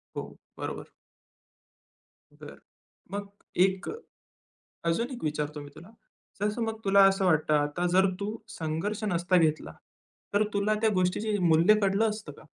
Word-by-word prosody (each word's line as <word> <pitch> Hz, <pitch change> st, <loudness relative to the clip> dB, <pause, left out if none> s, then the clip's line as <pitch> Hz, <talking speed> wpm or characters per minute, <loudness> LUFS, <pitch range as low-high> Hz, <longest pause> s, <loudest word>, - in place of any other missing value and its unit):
हो. -, -, -6 dB, 0.2 s
बरोबर. -, -, -6 dB, 1.4 s
बरं. -, -, -12 dB, 0.5 s
मग 200 Hz, 0 st, -4 dB, 0.4 s
एक 190 Hz, -1 st, -3 dB, 1.0 s
अजून 230 Hz, +10 st, 0 dB
एक 245 Hz, -, -8 dB
विचारतो 150 Hz, 0 st, -2 dB
मी 145 Hz, -, -10 dB
तुला. 165 Hz, +5 st, -13 dB, 0.5 s
जसं 210 Hz, +3 st, -1 dB
मग 225 Hz, -1 st, -3 dB
तुला 195 Hz, 0 st, +6 dB
असं 195 Hz, 0 st, 0 dB
वाटतं 155 Hz, -3 st, +2 dB
आता 150 Hz, +4 st, +1 dB
जर 190 Hz, +1 st, +4 dB
तू 210 Hz, +2 st, -3 dB, 0.2 s
संघर्ष 165 Hz, +7 st, -3 dB
नसता 180 Hz, -2 st, +2 dB
घेतला, 155 Hz, -2 st, +1 dB, 0.6 s
तर 205 Hz, -, +4 dB
तुला 205 Hz, +1 st, +1 dB
त्या 220 Hz, -, +4 dB
गोष्टीचे 200 Hz, +3 st, 0 dB
मूल्य 170 Hz, +7 st, +6 dB
कळलं 200 Hz, +3 st, +2 dB
असतं 210 Hz, -7 st, -6 dB
का? 145 Hz, -, -16 dB
190 Hz, 140 wpm, -28 LUFS, 160-210 Hz, 1.4 s, तुला